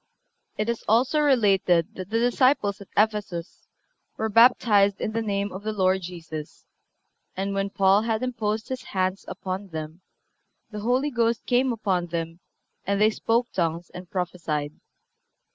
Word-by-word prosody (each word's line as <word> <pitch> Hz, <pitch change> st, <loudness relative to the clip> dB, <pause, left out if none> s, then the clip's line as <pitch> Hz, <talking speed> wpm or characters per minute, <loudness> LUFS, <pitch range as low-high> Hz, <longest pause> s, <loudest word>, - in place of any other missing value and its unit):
(354) 215 Hz, -, 0 dB
It 220 Hz, -, -4 dB
is -, -, -19 dB
also 250 Hz, +7 st, +3 dB
related 200 Hz, -, +3 dB
that 185 Hz, -2 st, -7 dB
the 225 Hz, +1 st, +1 dB
disciples 245 Hz, -4 st, +2 dB
at 200 Hz, -, -11 dB
Ephesus 205 Hz, -5 st, -1 dB, 0.5 s
"were 220 Hz, -, -1 dB
baptized 210 Hz, -3 st, +5 dB
in -, -, -2 dB
the 230 Hz, +1 st, -1 dB
name 200 Hz, -2 st, -2 dB
of 190 Hz, -, -7 dB
the 215 Hz, +1 st, -3 dB
Lord 190 Hz, -2 st, +1 dB
Jesus, 165 Hz, -4 st, -8 dB, 0.7 s
and 195 Hz, +1 st, -2 dB
when 195 Hz, 0 st, -1 dB
Paul 195 Hz, +1 st, +3 dB
had 225 Hz, +1 st, -1 dB
imposed 225 Hz, -2 st, -2 dB
his 260 Hz, -1 st, -4 dB
hands 185 Hz, 0 st, -2 dB
upon 190 Hz, +1 st, -5 dB
them 160 Hz, 0 st, -7 dB, 0.7 s
the 210 Hz, -, -5 dB
Holy 250 Hz, +7 st, +1 dB
Ghost 235 Hz, -2 st, 0 dB
came 250 Hz, +1 st, +2 dB
upon 195 Hz, -6 st, -1 dB
them 165 Hz, 0 st, -4 dB, 0.4 s
and 200 Hz, +1 st, 0 dB
they 215 Hz, +1 st, +5 dB
spoke 235 Hz, +2 st, 0 dB
tongues 170 Hz, -1 st, -2 dB
and 180 Hz, 0 st, -10 dB
prophesied." 165 Hz, -6 st, -3 dB
200 Hz, 155 wpm, -25 LUFS, 180-225 Hz, 0.7 s, baptized